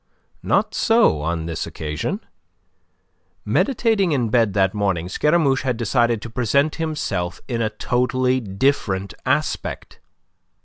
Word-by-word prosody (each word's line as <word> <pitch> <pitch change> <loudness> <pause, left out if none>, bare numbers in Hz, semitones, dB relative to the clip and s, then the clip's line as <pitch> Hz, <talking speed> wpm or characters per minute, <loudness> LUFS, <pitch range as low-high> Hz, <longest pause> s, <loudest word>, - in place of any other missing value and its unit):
Not - - +1
so 225 - +3
on 80 +1 -2
this 80 -1 -4
occasion. 80 - -4 1.2
Meditating 220 - +1
in 120 -5 0
bed 115 -3 +2
that 95 -1 +2
morning, 95 -5 -1
Scaramouche 150 - +2
had 130 -3 -1
decided 120 -1 +1
to 120 - -6
present 140 +6 +1
himself 105 - -2
in 120 -3 -2
a 110 - +1
totally 125 +3 0
different 100 -3 -1
aspect. - - -2
120 Hz, 120 wpm, -21 LUFS, 95-140 Hz, 1.2 s, so